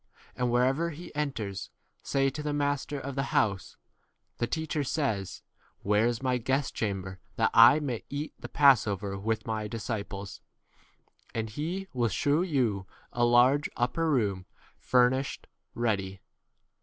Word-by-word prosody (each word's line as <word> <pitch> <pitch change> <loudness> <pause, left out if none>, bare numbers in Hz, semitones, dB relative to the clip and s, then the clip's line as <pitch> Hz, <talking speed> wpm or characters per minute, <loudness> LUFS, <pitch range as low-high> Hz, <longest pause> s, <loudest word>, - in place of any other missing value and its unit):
And 125 -1 0
wher 120 +1 +3
ever 150 +6 +1
he 170 +2 -9
enters, 125 -10 -3 0.3
say 135 0 +1
to 150 +3 -6
the 150 0 -2
master 145 0 -1
of 140 +1 -5
the 135 0 -1
house, 100 -3 0 0.6
The 120 - 0
teacher 160 0 -2
says, 125 - -2 0.4
Where 105 +3 +3
is 120 0 -2
myi 125 -3 0
guest 135 +3 0
chamber 95 -3 -3 0.2
that - - +2
I 120 +6 +8
may 130 -7 -3
eat 145 +2 -4
the - - -8
passover 105 -8 +3
with 110 +1 -2
my 110 -1 -2
15 - - -6
disciples? 100 -3 -5 0.9
and 110 -1 -2
he 170 - -4
will 120 -3 +1
shew 145 - +1
you 120 - 0 0.3
a 120 - +1
large 125 +4 +4
upper 125 +7 0
room 100 -9 0 0.3
furnished 130 +2 +2 0.3
ready. 100 -5 -1
125 Hz, 145 wpm, -29 LUFS, 105-145 Hz, 0.9 s, I